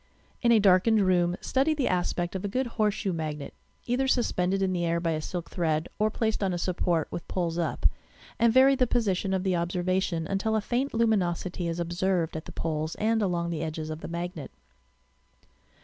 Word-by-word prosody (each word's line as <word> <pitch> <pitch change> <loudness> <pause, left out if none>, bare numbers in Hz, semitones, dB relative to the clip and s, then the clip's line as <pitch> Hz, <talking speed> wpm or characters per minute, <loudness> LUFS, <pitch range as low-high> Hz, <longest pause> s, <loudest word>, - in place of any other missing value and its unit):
In 235 - +4
a 230 - +7
darkened 205 +2 +4
room 175 -1 +2
study 275 +4 +1
the 280 -4 0
aspect 175 -1 -1
of 190 - -3
a - - -1
good 255 +6 -1
horseshoe 215 -4 -1
magnet, 155 -3 -4 0.3
either 255 +2 0
suspended 195 -7 +1
in 185 -1 +1
the 175 -1 -1
air 170 0 +1
by 170 -1 0
a 155 -1 -1
silk 175 +1 -5
thread 160 -2 0
or 215 +1 +3
placed 220 0 -1
on 190 -2 +1
a - - -2
support, 175 -2 0
with 170 - -6
poles 175 -2 -2
up, 165 - -2 0.5
and 235 0 +5
vaiy 265 +3 +6
the 255 -2 +2
position 200 -5 0
of 190 -1 0
the 190 -2 +1
observation 175 0 -1
until 200 +5 -1
a - - +3
faint 250 +6 -1
luminosity 185 -6 0
is 165 +1 -3
observed 175 -1 0
at 160 - -5
the - - -9
poles 155 0 -3
and 220 +1 +1
along 175 -3 0
the 165 - -3
edges 155 -1 -4
of 155 +1 -6
the - - -6
magnet. 170 -4 -5
185 Hz, 195 wpm, -27 LUFS, 170-220 Hz, 0.5 s, a